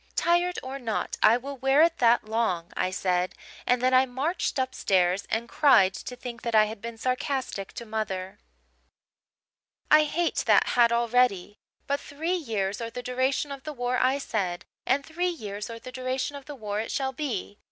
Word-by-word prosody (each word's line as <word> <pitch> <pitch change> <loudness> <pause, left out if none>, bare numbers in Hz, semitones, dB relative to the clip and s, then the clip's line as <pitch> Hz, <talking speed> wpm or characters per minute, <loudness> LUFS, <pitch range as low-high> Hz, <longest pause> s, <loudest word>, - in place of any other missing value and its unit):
"'Tired 350 +1 +2
or 265 +1 -6
not, 225 -4 -2
I 230 - +6
will 275 +3 -7
wear 270 +4 +4
it 335 0 +2
that 240 0 +4
long,' 215 -6 -1
I 185 - 0
said: 185 -1 -1 0.3
and 250 0 +2
then 255 0 +3
I 260 +1 +5
marched 285 +9 -2
upstairs 190 -8 +1
and 230 +1 -1
cried 240 -12 +5
to 250 - -7
think 240 -2 -8
that 235 -1 -2
I 215 0 +7
had 215 -1 -7
been 235 0 -6
sarcastic 255 -5 -2
to 235 - -7
mother. 195 -4 -4 1.5
"I 305 0 +7
hate 335 +3 -1
that - - +5
hat 235 -1 +4
already. 235 -4 +1 0.3
But 280 0 0
three 320 +5 -3
years 215 - -2
or 230 - -3
the 245 +1 -7
duration 260 +3 0
of 275 -1 -6
the 305 +2 -6
war, 245 -1 -1
I 260 +2 +3
said, 185 -10 -3 0.2
and 280 +2 +2
three 350 +3 -1
years 210 - -6
or 230 - -6
the 255 +2 -10
duration 255 +2 -3
of 280 -1 -9
the 295 - -8
war 210 -4 -4
it 225 - -3
shall 265 -1 -1
be. 240 -8 -4
245 Hz, 185 wpm, -27 LUFS, 215-275 Hz, 1.5 s, I